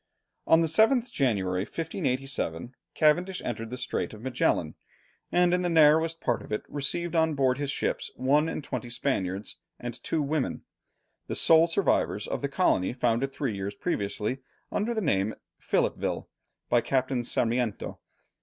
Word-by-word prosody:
On 160 Hz, 0 st, +6 dB
the 165 Hz, -, +2 dB
7th 230 Hz, -, +3 dB
January, 100 Hz, -, 0 dB
1587, 130 Hz, -, -3 dB, 0.2 s
Cavendish 175 Hz, +5 st, +2 dB
entered 115 Hz, -1 st, -4 dB
the 125 Hz, -, -5 dB
Strait 125 Hz, -3 st, -3 dB
of 110 Hz, -, -13 dB
Magellan, 130 Hz, -2 st, 0 dB, 0.6 s
and 175 Hz, 0 st, +3 dB
in 180 Hz, -, +2 dB
the 175 Hz, -, 0 dB
narrowest 160 Hz, 0 st, +4 dB
part 120 Hz, -7 st, 0 dB
of -, -, -12 dB
it 105 Hz, -, -1 dB
received 160 Hz, +4 st, -1 dB
on 160 Hz, -1 st, +2 dB
board 130 Hz, -1 st, +2 dB
his 145 Hz, -1 st, -2 dB
ships -, -, -1 dB
one 145 Hz, +5 st, +2 dB
and 155 Hz, -, -4 dB
twenty 125 Hz, -3 st, -5 dB
Spaniards 100 Hz, -6 st, -2 dB, 0.2 s
and 120 Hz, 0 st, -6 dB
two 160 Hz, -2 st, 0 dB
women, 145 Hz, -1 st, -2 dB, 0.6 s
the -, -, -3 dB
sole 165 Hz, +1 st, +6 dB
survivors 170 Hz, +3 st, +1 dB
of -, -, -3 dB
the -, -, -1 dB
colony 90 Hz, +5 st, +2 dB
founded 125 Hz, +2 st, 0 dB
three 135 Hz, -6 st, -2 dB
years 100 Hz, +1 st, -4 dB
previously, 105 Hz, -, -2 dB, 0.3 s
under 230 Hz, +3 st, -1 dB
the 220 Hz, -, 0 dB
name 105 Hz, -, +1 dB
of -, -, -15 dB, 0.2 s
Philippeville, -, -, -1 dB, 0.4 s
by 120 Hz, -, +3 dB
Captain 130 Hz, -1 st, 0 dB
Sarmiento. 120 Hz, -2 st, -1 dB
135 Hz, 155 wpm, -28 LUFS, 120-160 Hz, 0.6 s, On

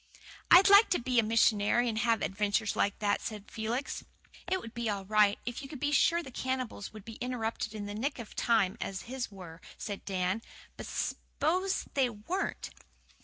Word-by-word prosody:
"I'd 370 Hz, +3 st, +9 dB
like 405 Hz, +2 st, +8 dB
to 360 Hz, -, +2 dB
be 250 Hz, 0 st, +2 dB
a -, -, +4 dB
missionary 225 Hz, +1 st, +3 dB
and 220 Hz, -1 st, -1 dB
have 230 Hz, -2 st, +2 dB
adventures 205 Hz, +1 st, 0 dB
like 200 Hz, -, +1 dB
that," 205 Hz, -2 st, 0 dB
said 210 Hz, -2 st, -7 dB
Felix. 235 Hz, +5 st, -3 dB, 0.5 s
"It 375 Hz, -, +2 dB
would 230 Hz, -9 st, -10 dB
be 235 Hz, -1 st, -2 dB
all 200 Hz, -2 st, -3 dB
right 210 Hz, 0 st, +4 dB
if 245 Hz, +1 st, -4 dB
you 270 Hz, -, -9 dB
could 290 Hz, -, -8 dB
be 290 Hz, +2 st, 0 dB
sure 335 Hz, +4 st, +3 dB
the 265 Hz, -, -10 dB
cannibals 255 Hz, -5 st, -3 dB
would 215 Hz, -2 st, -11 dB
be 225 Hz, -1 st, -9 dB
interrupted 230 Hz, -3 st, -3 dB
in 205 Hz, -1 st, -4 dB
the 205 Hz, -, -5 dB
nick 270 Hz, +7 st, -2 dB
of 235 Hz, -3 st, -9 dB
time 220 Hz, -5 st, +2 dB
as 190 Hz, -2 st, -4 dB
his 255 Hz, +1 st, -4 dB
were," 180 Hz, -4 st, -11 dB, 0.2 s
said 205 Hz, -2 st, -5 dB
Dan. 190 Hz, +2 st, -1 dB, 0.3 s
"But -, -, -8 dB
sposen 370 Hz, +6 st, -1 dB
they 265 Hz, -3 st, +2 dB
weren't?" 240 Hz, -, -4 dB
225 Hz, 190 wpm, -31 LUFS, 205-260 Hz, 0.5 s, I'd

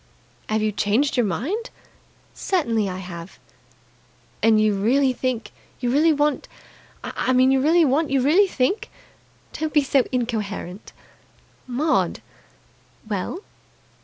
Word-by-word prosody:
"Have 215 Hz, 0 st, 0 dB
you 215 Hz, -, +1 dB
changed 210 Hz, +8 st, +1 dB
your 245 Hz, -4 st, +2 dB
mind?" 330 Hz, -, -3 dB, 0.6 s
"Certainly 230 Hz, -, 0 dB
I 185 Hz, -, -5 dB
have!" 180 Hz, -1 st, -9 dB, 1.0 s
"And 225 Hz, -1 st, +4 dB
you 215 Hz, -1 st, +3 dB
really 255 Hz, +7 st, +2 dB
think 250 Hz, -2 st, -3 dB, 0.3 s
You 245 Hz, -1 st, -1 dB
really 310 Hz, +5 st, +4 dB
want 295 Hz, -1 st, 0 dB, 0.6 s
I 260 Hz, -, -1 dB
mean, 255 Hz, +1 st, +4 dB
you 270 Hz, -1 st, +3 dB
really 325 Hz, +4 st, +4 dB
want 290 Hz, +3 st, +1 dB
You 275 Hz, 0 st, +2 dB
really 355 Hz, +9 st, +4 dB
think 285 Hz, -, -1 dB, 0.3 s
" -, -, -34 dB
"Don't 310 Hz, 0 st, -2 dB
be 295 Hz, -1 st, +4 dB
so 275 Hz, -1 st, +3 dB
incoherent!" 215 Hz, -6 st, -4 dB, 0.8 s
"Maud!" 285 Hz, +6 st, 0 dB, 0.8 s
"Well?" 210 Hz, -, -3 dB
255 Hz, 130 wpm, -22 LUFS, 215-295 Hz, 1.0 s, And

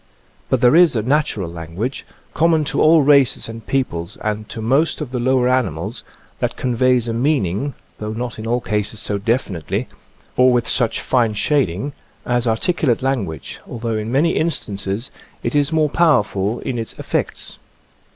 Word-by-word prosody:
But 130 Hz, -, +1 dB
there 125 Hz, +3 st, +5 dB
is 170 Hz, -5 st, +6 dB
a 110 Hz, -, 0 dB
natural 130 Hz, -, 0 dB
language, 85 Hz, +9 st, -5 dB, 0.3 s
common 160 Hz, -1 st, +3 dB
to -, -, -1 dB
all 155 Hz, -1 st, +6 dB
races 140 Hz, -2 st, +4 dB
and 115 Hz, 0 st, -8 dB
peoples 105 Hz, -9 st, -2 dB
and 105 Hz, 0 st, -3 dB
to 115 Hz, -, -6 dB
most 135 Hz, +9 st, +2 dB
of 150 Hz, -5 st, -5 dB
the 125 Hz, -, -2 dB
lower 125 Hz, 0 st, +2 dB
animals, 115 Hz, -, -1 dB, 0.4 s
that -, -, -1 dB
conveys 125 Hz, -1 st, +1 dB
a 115 Hz, -, -1 dB
meaning, 130 Hz, -, 0 dB, 0.2 s
though 105 Hz, 0 st, -4 dB
not 120 Hz, +1 st, -5 dB
in 110 Hz, -, -5 dB
all 120 Hz, +2 st, +1 dB
cases 105 Hz, -1 st, -2 dB
so 100 Hz, -1 st, -2 dB
definitely, 100 Hz, -, -1 dB, 0.5 s
or 130 Hz, 0 st, +5 dB
with 120 Hz, -1 st, +1 dB
such 120 Hz, -2 st, +1 dB
fine 115 Hz, -4 st, +1 dB
shading, 135 Hz, -, 0 dB, 0.3 s
as 120 Hz, 0 st, 0 dB
articulate 130 Hz, +2 st, +1 dB
language, 100 Hz, -, -2 dB
although 115 Hz, -1 st, -3 dB
in 110 Hz, +1 st, -3 dB
many 150 Hz, +6 st, +3 dB
instances 110 Hz, -7 st, -1 dB, 0.3 s
it -, -, -1 dB
is 145 Hz, 0 st, +2 dB
more 155 Hz, -1 st, +3 dB
powerful 110 Hz, -, +2 dB
in 120 Hz, -2 st, -3 dB
its 115 Hz, -, -4 dB
effects. -, -, -4 dB
120 Hz, 160 wpm, -20 LUFS, 105-135 Hz, 0.5 s, is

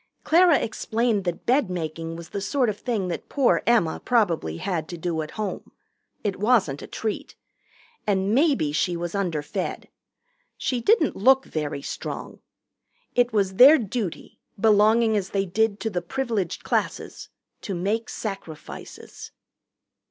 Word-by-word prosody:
Clara 340 Hz, -2 st, +5 dB
explained 220 Hz, -2 st, -1 dB
that 175 Hz, -1 st, -3 dB
bed 255 Hz, -3 st, +2 dB
making 165 Hz, -1 st, -4 dB
was 170 Hz, 0 st, -9 dB
the 200 Hz, -, -4 dB
sort 255 Hz, +3 st, +1 dB
of 205 Hz, -, -4 dB
thing 225 Hz, -7 st, -2 dB
that 175 Hz, -, -5 dB
poor 275 Hz, -4 st, +2 dB
Emma 220 Hz, -9 st, +2 dB
probably 175 Hz, -, +1 dB
had 165 Hz, -, -2 dB
to 175 Hz, -, -7 dB
do 165 Hz, -1 st, -2 dB
at 155 Hz, -, -6 dB
home. 210 Hz, -3 st, -4 dB, 0.5 s
It 200 Hz, -3 st, -1 dB
wasn't 205 Hz, -, +2 dB
a -, -, -8 dB
treat. 220 Hz, -2 st, -4 dB, 0.7 s
And 195 Hz, 0 st, +1 dB
maybe 270 Hz, -, +3 dB
she 175 Hz, +3 st, 0 dB
was 170 Hz, 0 st, -4 dB
underfed. 170 Hz, -7 st, -3 dB, 0.7 s
She 250 Hz, -3 st, -1 dB
didn't 370 Hz, -, +3 dB
look 265 Hz, +6 st, +4 dB
very 150 Hz, -3 st, -4 dB
strong. -, -, -6 dB, 0.7 s
It 245 Hz, 0 st, +3 dB
was 195 Hz, -3 st, 0 dB
their 280 Hz, +5 st, +9 dB
duty, 215 Hz, -, -4 dB, 0.2 s
belonging 220 Hz, +2 st, +4 dB
as 195 Hz, -2 st, -1 dB
they 195 Hz, -1 st, 0 dB
did 210 Hz, +3 st, 0 dB
to 220 Hz, -, -2 dB
the 180 Hz, -2 st, -1 dB
Privileged 220 Hz, -1 st, -2 dB
Classes, -, -, -2 dB, 0.3 s
to 195 Hz, -, -4 dB
make 210 Hz, +6 st, -1 dB
Sacrifices. 195 Hz, -7 st, -8 dB
205 Hz, 145 wpm, -24 LUFS, 175-235 Hz, 0.7 s, their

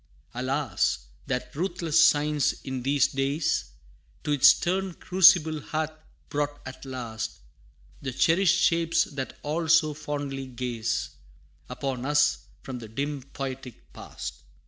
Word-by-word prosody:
Alas! 130 Hz, -2 st, -1 dB, 0.2 s
that 125 Hz, 0 st, -3 dB
ruthless 170 Hz, -1 st, +2 dB
science 150 Hz, -1 st, +3 dB
in 130 Hz, -1 st, -4 dB
these 140 Hz, +1 st, +3 dB
days, 140 Hz, +3 st, 0 dB, 0.6 s
To 150 Hz, -, -2 dB
its 145 Hz, -3 st, +6 dB
stern 185 Hz, 0 st, +3 dB
crucible 175 Hz, -4 st, +5 dB
hath 155 Hz, +2 st, -2 dB, 0.4 s
brought 145 Hz, 0 st, -2 dB
at 130 Hz, +1 st, -9 dB
last, 115 Hz, -4 st, -5 dB, 0.6 s
The 135 Hz, -, -3 dB
cherished 175 Hz, +7 st, +3 dB
shapes 165 Hz, -2 st, +3 dB
that 135 Hz, -3 st, -6 dB
all 160 Hz, +3 st, -2 dB
so 160 Hz, -1 st, +4 dB
fondly 145 Hz, -2 st, -4 dB
gaze 120 Hz, -3 st, -3 dB, 0.6 s
Upon 130 Hz, -3 st, -3 dB
us 145 Hz, 0 st, +3 dB, 0.2 s
from 130 Hz, -2 st, -6 dB
the 115 Hz, -, -9 dB
dim 140 Hz, +5 st, -3 dB
poetic 130 Hz, -2 st, -8 dB
past! -, -, -8 dB
145 Hz, 125 wpm, -27 LUFS, 130-160 Hz, 0.6 s, its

